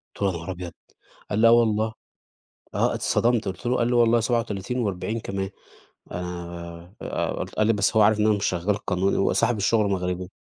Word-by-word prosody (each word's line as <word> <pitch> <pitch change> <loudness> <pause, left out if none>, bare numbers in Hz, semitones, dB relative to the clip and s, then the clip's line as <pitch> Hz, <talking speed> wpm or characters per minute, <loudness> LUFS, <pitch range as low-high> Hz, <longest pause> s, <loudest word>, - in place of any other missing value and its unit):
قُلت - - -14
له: 100 - +3
"يا 85 - -4
نهار 85 +3 -6
أبيض!" 90 -1 -6 0.6
قال 105 - -1
لي: 115 - +6
"آه 115 - +7
والله." 110 -1 +3 0.8
آه، - - +1
اتصدمت، 120 -3 +1
قُلت 95 +6 -6
له 125 - +2
قال 120 - +1
لي: - - 0
"والله 120 -1 +4
37 115 0 -1
و40 110 +1 -2
كمان." 95 -1 -4 0.6
أنا 85 0 -7
آآ، - - -2
قُلت - - -5
قال 110 - +2
لي: 115 - +4
"بس 105 +2 +1
هو 110 - +7
عارف 105 +1 +4
إن 105 - +3
أنا 105 - +4
مش 100 - -1
شغّال 95 +3 0
قانوني." 95 +2 +1
هو 95 - +2
صاحب 115 0 +2
الشغل 105 0 +2
مغربي. 90 -1 -2
105 Hz, 205 wpm, -24 LUFS, 90-115 Hz, 0.8 s, آه